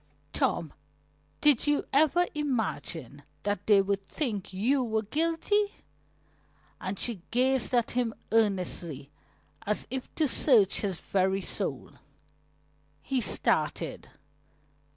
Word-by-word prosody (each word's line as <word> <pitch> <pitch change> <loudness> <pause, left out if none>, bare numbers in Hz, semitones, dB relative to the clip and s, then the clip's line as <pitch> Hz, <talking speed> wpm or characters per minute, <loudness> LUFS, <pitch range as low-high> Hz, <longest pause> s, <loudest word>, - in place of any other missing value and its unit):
"Tom, 160 -4 0 0.7
did 295 -2 +5
you 295 0 +2
ever 315 +5 +4
imagine 225 - -3 0.5
they 200 -2 +6
would 195 0 -2
think 220 - -2
you 250 +8 +1
were 220 -2 -1
guilty?" 330 - 0 1.0
and 190 +1 -4
she 225 -4 -2
gazed 255 +1 +1
at 235 -1 +2
him 240 -2 0 0.2
earnestly, 180 -9 0 0.5
as 210 +1 -1
if 260 0 -4
to 310 - +2
search 225 -8 +4
his 195 -5 -2
very 190 0 0
soul. - - -3 1.1
He 265 -2 0
started. 210 - 0
225 Hz, 105 wpm, -29 LUFS, 195-275 Hz, 1.1 s, they